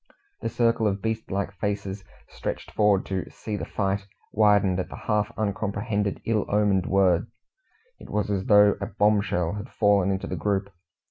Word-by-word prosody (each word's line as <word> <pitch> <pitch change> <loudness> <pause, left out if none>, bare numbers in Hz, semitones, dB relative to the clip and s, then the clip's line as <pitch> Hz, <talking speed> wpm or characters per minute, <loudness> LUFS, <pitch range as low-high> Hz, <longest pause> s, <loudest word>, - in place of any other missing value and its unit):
The - - -2
circle 115 -2 +2
of 100 0 -1
beast 110 0 -2
like 100 +1 -2
faces, 100 -1 -3 0.3
stretched - - -5
forward 105 -2 +3
to 95 -1 -3
"see 110 - -6
the - - -4
fight," 100 -1 -2 0.2
widened 100 -3 +3
at 90 - -3
the - - -8
half 105 -1 -1
uncomprehended, 100 0 -2
ill 110 -2 +1
omened 100 -3 +2
word. 95 -2 +3 0.7
It - - -12
was 105 -1 -1
as 95 -1 -1
though 105 -1 +6
a 100 - -2
bombshell 100 -6 +1
had 105 +4 -6
fallen 100 -3 +3
into 95 -1 -1
the - - -4
group. 100 -1 -1
100 Hz, 170 wpm, -25 LUFS, 95-105 Hz, 0.7 s, though